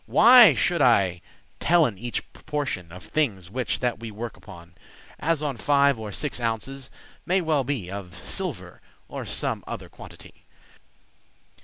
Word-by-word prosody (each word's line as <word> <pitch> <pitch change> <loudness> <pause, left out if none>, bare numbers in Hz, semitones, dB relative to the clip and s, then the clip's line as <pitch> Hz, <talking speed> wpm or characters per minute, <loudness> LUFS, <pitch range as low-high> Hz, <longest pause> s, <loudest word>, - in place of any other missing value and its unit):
Why 235 - +8
should 170 +3 +1
I 95 -9 +3 0.4
tellen 155 - +2
each 120 +1 -4
proportion 130 - -4
Of 90 0 -11
thinges, 95 - -2
whiche 125 +2 -1
that 125 -3 -1
we 115 -1 -7
work 110 +2 -7
upon, 85 -3 -14 0.5
As 160 -1 0
on 140 -5 -2
five 140 0 +3
or 110 -1 -6
six 145 +4 -3
ounces, 120 +3 -3 0.3
may 185 +2 +1
well 155 -5 +1
be, 120 -9 -3
Of 95 -4 -7
silver, - - -4 0.3
or - - -6
some - - -2
other - - -7
quantity? - - -14
120 Hz, 145 wpm, -25 LUFS, 100-150 Hz, 0.5 s, Why